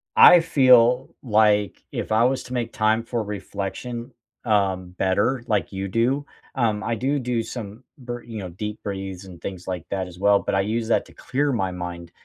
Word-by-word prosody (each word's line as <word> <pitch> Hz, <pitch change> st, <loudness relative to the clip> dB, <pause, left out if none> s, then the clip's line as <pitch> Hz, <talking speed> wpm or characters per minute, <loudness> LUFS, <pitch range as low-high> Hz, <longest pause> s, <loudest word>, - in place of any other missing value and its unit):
I 175 Hz, 0 st, +9 dB
feel 130 Hz, -5 st, +4 dB
like 105 Hz, -4 st, +2 dB
if -, -, -4 dB
I 110 Hz, +1 st, +4 dB
was 130 Hz, +1 st, 0 dB
to 125 Hz, -, -9 dB
make 120 Hz, -2 st, -2 dB
time 110 Hz, +1 st, +2 dB
for 120 Hz, -1 st, -2 dB
reflection, 105 Hz, +5 st, -5 dB, 0.3 s
um, 95 Hz, -5 st, +1 dB
better, 100 Hz, +7 st, 0 dB
like 100 Hz, -5 st, 0 dB
you 95 Hz, 0 st, -4 dB
do, 125 Hz, +8 st, +1 dB, 0.3 s
um, 110 Hz, -4 st, 0 dB
I 115 Hz, -, -1 dB
do 135 Hz, +5 st, 0 dB
do 120 Hz, -3 st, -1 dB
some 110 Hz, +1 st, -7 dB
br 120 Hz, -2 st, -6 dB
you 115 Hz, -2 st, -7 dB
know, 90 Hz, -2 st, -6 dB
deep 105 Hz, +5 st, -6 dB
breathes 95 Hz, -2 st, -5 dB
and 90 Hz, -3 st, -12 dB
things 90 Hz, -2 st, -7 dB
like 90 Hz, -3 st, -4 dB
that 95 Hz, -2 st, -2 dB
as 90 Hz, -1 st, -12 dB
well, 100 Hz, 0 st, +4 dB
but 95 Hz, -, -2 dB
I 95 Hz, -, +3 dB
use 110 Hz, +3 st, -2 dB
that -, -, +2 dB
to -, -, -17 dB
clear 140 Hz, +2 st, -1 dB
my 95 Hz, -7 st, -1 dB
mind, 85 Hz, -1 st, -6 dB
110 Hz, 195 wpm, -23 LUFS, 95-120 Hz, 0.3 s, I